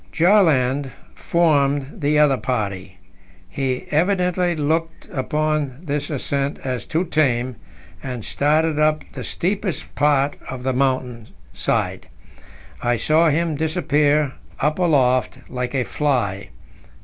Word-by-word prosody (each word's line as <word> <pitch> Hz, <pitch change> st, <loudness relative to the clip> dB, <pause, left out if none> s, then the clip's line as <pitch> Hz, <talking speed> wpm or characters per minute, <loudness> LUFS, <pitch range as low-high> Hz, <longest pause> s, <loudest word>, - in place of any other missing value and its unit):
Bjaaland 145 Hz, -8 st, +3 dB, 0.2 s
formed 145 Hz, -4 st, +1 dB
the 150 Hz, +1 st, +2 dB
other 150 Hz, -2 st, +5 dB
party. 100 Hz, -6 st, -3 dB, 0.5 s
He 130 Hz, -2 st, -2 dB
evidently 180 Hz, +1 st, +1 dB
looked 165 Hz, +2 st, -2 dB
upon 150 Hz, -1 st, -1 dB
this 145 Hz, -3 st, -2 dB
ascent 140 Hz, -1 st, -1 dB
as 125 Hz, -4 st, -3 dB
too 165 Hz, +3 st, 0 dB
tame, 130 Hz, -, 0 dB, 0.4 s
and 125 Hz, -4 st, -5 dB
started 155 Hz, +1 st, +1 dB
up 155 Hz, 0 st, +2 dB
the -, -, -6 dB
steepest 190 Hz, 0 st, -2 dB
part 145 Hz, -1 st, +2 dB
of 130 Hz, -1 st, -6 dB
the 130 Hz, 0 st, 0 dB
mountain 125 Hz, -3 st, -1 dB, 0.3 s
side. -, -, -1 dB, 0.7 s
I 120 Hz, 0 st, +1 dB
saw 155 Hz, +8 st, +3 dB
him 165 Hz, +2 st, +1 dB
disappear 150 Hz, -2 st, +1 dB, 0.3 s
up 150 Hz, +4 st, 0 dB
aloft 130 Hz, -7 st, +2 dB
like 125 Hz, +1 st, -4 dB
a 130 Hz, -, +1 dB
fly. 120 Hz, -10 st, -1 dB
145 Hz, 115 wpm, -21 LUFS, 130-155 Hz, 0.7 s, other